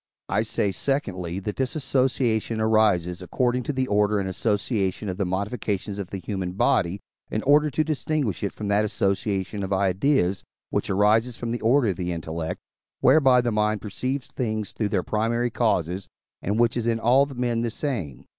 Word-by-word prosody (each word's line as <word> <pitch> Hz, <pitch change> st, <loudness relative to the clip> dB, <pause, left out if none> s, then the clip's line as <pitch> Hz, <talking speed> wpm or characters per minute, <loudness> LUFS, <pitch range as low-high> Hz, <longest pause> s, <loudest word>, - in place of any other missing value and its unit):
I 100 Hz, +4 st, +2 dB
say, 105 Hz, -2 st, 0 dB
secondly, 95 Hz, -, -2 dB
that 105 Hz, +1 st, -4 dB
this 130 Hz, +2 st, -1 dB
association 125 Hz, -5 st, +1 dB
arises 105 Hz, -5 st, +2 dB
according 125 Hz, +7 st, 0 dB
to -, -, -1 dB
the 130 Hz, -2 st, 0 dB
order 105 Hz, -2 st, +2 dB
and 95 Hz, -, -2 dB
association 100 Hz, 0 st, -1 dB
of 90 Hz, -, -4 dB
the 100 Hz, -, -1 dB
modifications 100 Hz, +1 st, -2 dB
of 100 Hz, -, -4 dB
the 100 Hz, -, -4 dB
human 95 Hz, 0 st, -4 dB
body, 95 Hz, 0 st, +1 dB, 0.3 s
in 110 Hz, -, -2 dB
order 150 Hz, +2 st, +4 dB
to 155 Hz, +3 st, +1 dB
distinguish 150 Hz, -, -1 dB
it 100 Hz, -, -1 dB
from 105 Hz, -, -6 dB
that 100 Hz, +1 st, +3 dB
association 100 Hz, -1 st, -1 dB
of 95 Hz, 0 st, -4 dB
ideas, 95 Hz, +1 st, +1 dB, 0.3 s
which -, -, -1 dB
arises 110 Hz, +5 st, +2 dB
from 120 Hz, -1 st, -4 dB
the 120 Hz, -, -3 dB
order 120 Hz, +1 st, +3 dB
of 90 Hz, -, -2 dB
the 90 Hz, -1 st, -2 dB
intellect, 80 Hz, 0 st, -4 dB, 0.4 s
whereby 130 Hz, -2 st, +6 dB
the 120 Hz, -1 st, -1 dB
mind 105 Hz, 0 st, +1 dB
perceives 130 Hz, +7 st, -4 dB
things 110 Hz, -5 st, -2 dB
through 105 Hz, +2 st, -2 dB
their 95 Hz, -4 st, 0 dB
primary 115 Hz, +2 st, 0 dB
causes, 95 Hz, -5 st, 0 dB, 0.3 s
and 105 Hz, +4 st, -1 dB
which 120 Hz, -1 st, +3 dB
is 120 Hz, -1 st, -1 dB
in 115 Hz, -1 st, +1 dB
all 130 Hz, +5 st, +4 dB
men 120 Hz, -2 st, 0 dB
the 120 Hz, -, 0 dB
same. 105 Hz, -, -3 dB
105 Hz, 180 wpm, -25 LUFS, 95-120 Hz, 0.4 s, whereby